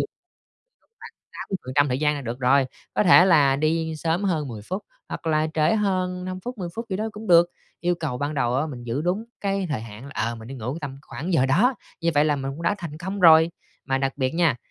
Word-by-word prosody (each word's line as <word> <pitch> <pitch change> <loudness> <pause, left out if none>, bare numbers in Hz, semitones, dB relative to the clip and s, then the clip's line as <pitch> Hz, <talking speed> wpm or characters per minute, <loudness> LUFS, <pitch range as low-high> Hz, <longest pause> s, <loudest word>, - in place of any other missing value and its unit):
khoảng - - -2 1.3
80% 145 -6 0
thời 125 0 0
gian 150 -1 +2
là 145 - -4
được 120 +1 -5
rồi, 130 +1 +4 0.3
có - - +3
thể 180 0 +8
là 145 -7 +5
đi 160 +1 0
sớm 165 +5 -1
hơn 155 -7 0
10 110 -3 -7
phút, 185 - -4 0.3
hoặc - - -7
là 155 -1 +2
trễ 155 +7 +3
hơn 185 -3 0
5 185 0 -5
phút, 245 +2 -7
10 175 -2 -4
phút 230 +1 -5
gì 190 - 0
đó 220 +2 -2
cũng 215 +1 -9
được. 175 -1 +6 0.3
Yêu 175 0 +1
cầu 155 -7 -4
ban 145 +2 -2
đầu 125 -3 0
á 150 +4 0
mình 125 -5 -8
giữ 120 +6 -2
đúng 185 +6 -1 0.2
cái 195 -2 -1
thời 130 -7 -1
hạn, 115 +5 -10
ờ, 115 +2 -1
mình 115 +1 -10
đi 135 - -7
ngủ 125 +6 -4
tầm 135 -2 -6
khoảng 170 +5 -5
giờ 135 -5 +3
đó, 220 - +3 0.3
như 170 0 +2
vậy 145 +1 +4
là 150 -2 +2
mình 135 0 -3
cũng 165 +4 -8
đã 170 +4 +2
thành 155 -3 -7
công 190 +3 -4
rồi. 160 -1 +7 0.3
Mà 135 -1 0
đặc 135 -1 0
biệt 130 +2 -1
nha, 165 -8 +3
155 Hz, 240 wpm, -24 LUFS, 135-180 Hz, 1.3 s, thể